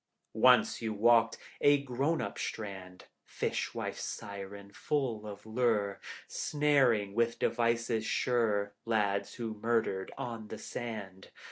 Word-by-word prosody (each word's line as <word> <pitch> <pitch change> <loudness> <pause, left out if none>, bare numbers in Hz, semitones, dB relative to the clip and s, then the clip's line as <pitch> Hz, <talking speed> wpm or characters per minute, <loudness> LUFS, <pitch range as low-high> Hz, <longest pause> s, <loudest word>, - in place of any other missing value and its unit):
Once 125 0 +5
you 110 -1 -1
walked 115 +2 +4 0.2
a 145 0 +6
grown 140 +5 0
up - - -5
strand 95 -4 -6 0.2
Fish - - -3
wife - - -3
siren, 100 0 -7
full 120 -8 -1
of 105 0 -9
lure, 110 -3 +1 0.3
Snaring 135 -9 +2
with 115 +1 +1
devices 115 -1 +1
sure 110 -4 +1
Lads 105 -3 0
who 115 -2 -4
murdered 110 -3 0
on 115 -3 -5
the 110 - -7
sand. 105 -5 -6
110 Hz, 120 wpm, -32 LUFS, 100-120 Hz, 0.3 s, a